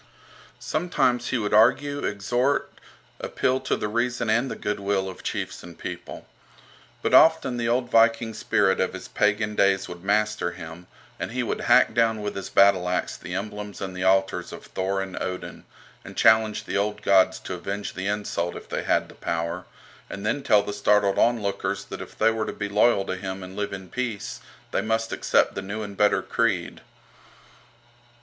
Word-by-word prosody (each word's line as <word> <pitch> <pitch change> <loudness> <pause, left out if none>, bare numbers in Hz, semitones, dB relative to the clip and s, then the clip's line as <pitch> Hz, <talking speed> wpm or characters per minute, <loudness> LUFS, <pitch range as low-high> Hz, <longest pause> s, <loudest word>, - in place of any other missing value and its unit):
Sometimes 135 -7 0
he 130 - 0
would 105 -3 -2
argue, 140 +7 +4
exhort, 120 +7 0 0.5
appeal 130 +1 0
to 130 - -1
the - - -2
reason 120 +1 0
and 120 +4 +2
the - - -4
goodwill 100 -1 -1
of 95 - -8
chiefs - - -4
and 85 -1 -12
people. 90 -1 -7 0.8
But - - 0
often 160 -6 +5
the 115 -1 -1
old 125 +1 0
Viking 115 0 +3
spirit 100 -2 +1
of 95 - 0
his 95 - -8
pagan 105 +1 +1
days 100 -1 +2
would 85 0 -9
master 105 -2 +1
him, 85 +1 -10 0.3
and - - -3
he - - -1
would - - -3
hack - - +5
down 115 -2 +2
with 105 - -3
his 100 - -5
battle 100 -2 +4
axe 90 - -1
the 90 - -7
emblems 105 +1 -5
and 95 -1 -5
the 90 - -3
altars 95 +1 +2
of - - -10
Thor 95 +1 -2
and 95 -1 -7
Odin, 90 0 -5 0.4
and - - -11
challenge 110 -1 +4
the 100 - -2
old 105 +1 -1
gods 95 -1 +4
to - - -6
avenge 100 +3 -4
the 95 +1 -4
insult 100 -4 -2
if - - -9
they - - -3
had - - +1
the - - -14
power, 85 +2 -3 0.4
and 100 +1 -6
then 140 +6 0
tell 105 -6 +4
the 105 - -5
startled 105 -1 +2
onlookers 110 -5 0
that - - -7
if - - -10
they 110 +1 +4
were 110 -1 -2
to - - -3
be 100 -1 -4
loyal 105 -1 +3
to 95 - -3
him 95 0 -5
and 90 +1 -9
live 105 0 -3
in 95 -1 -7
peace 120 -2 -4 0.3
they - - +1
must 115 0 -1
accept - - +2
the - - -4
new 105 +3 -5
and 100 -1 -7
better 105 0 +3
creed. 105 -7 -1
105 Hz, 185 wpm, -25 LUFS, 95-115 Hz, 0.8 s, often